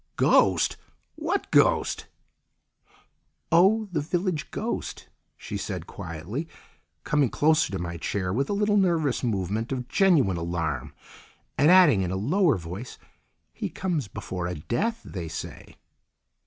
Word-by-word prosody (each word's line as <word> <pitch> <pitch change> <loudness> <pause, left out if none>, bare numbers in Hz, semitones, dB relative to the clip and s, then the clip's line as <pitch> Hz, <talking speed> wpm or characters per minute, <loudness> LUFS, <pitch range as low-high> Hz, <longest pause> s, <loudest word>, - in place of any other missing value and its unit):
"Ghost! - - +3 0.4
What 330 +6 -2
ghost?" - - +3 1.4
"Oh, 200 +6 +4
the 160 -4 0
village 175 +1 -2
ghost," - - -4 0.3
she - - -6
said - - -5
quietly, 85 - -6 0.6
coming 145 -4 +2
closer 155 0 +2
to 95 - -2
my 85 -1 -4
chair 90 +3 -2
with 135 +5 0
a - - 0
little 205 +1 +2
nervous 165 -10 +1
movement 110 +1 -1
of 125 -2 -3
genuine 145 - +3
alarm, 80 -5 -3 0.6
and 145 +3 +4
adding 175 - +7
in 90 - -1
a 95 - -2
lower 150 - +2
voice, 90 +8 -8 0.6
"He - - -4
comes 165 - -2
before 90 -1 -5
a 90 - -3
death, 220 - -2
they 90 -4 -6
say!" 80 - -8
135 Hz, 130 wpm, -26 LUFS, -, 1.4 s, adding